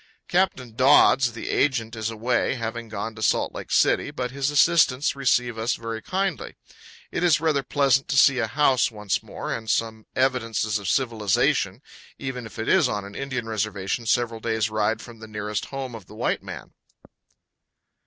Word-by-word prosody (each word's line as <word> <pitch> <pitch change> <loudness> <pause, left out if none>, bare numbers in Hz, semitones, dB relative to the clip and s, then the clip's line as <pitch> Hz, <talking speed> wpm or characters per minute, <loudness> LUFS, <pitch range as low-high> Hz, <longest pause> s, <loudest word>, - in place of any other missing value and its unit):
Captain 140 -11 0
Dodds, 130 -1 +5
the 115 - -5
agent, 120 -5 0
is 110 0 -2
away, 120 +3 0
having 115 -1 -5
gone 110 +1 -4
to 110 - -11
Salt - - +1
Lake - - -8
City, - - +3
but 125 -1 -4
his 140 +1 -1
assistants 145 -3 +3
receive 125 -4 +1
us 115 +2 0
very 115 -1 -5
kindly. 190 - -2 0.6
It - - -2
is 170 -2 +4
rather 155 -3 +1
pleasant 135 +1 +2
to 140 - -1
see 135 -1 +6
a 115 - 0
house 135 0 +3
once 105 -3 -2
more, - - -5
and 110 -1 -6
some 110 0 -1
evidences 115 -5 0
of 100 -3 -4
civilization, 115 -7 +1 0.3
even 130 -3 -5
if - - -14
it 110 - -4
is - - +4
on 105 -1 -3
an 100 - -10
Indian 130 -1 -4
reservation 110 0 -2
several 115 -1 +1
days' 110 -1 -1
ride 110 +1 0
from 120 -2 -12
the 110 - -10
nearest 105 -1 -4
home 135 -2 -6
of 110 -5 -10
the - - -13
white - - -1
man. - - -9
115 Hz, 175 wpm, -24 LUFS, 110-135 Hz, 0.6 s, see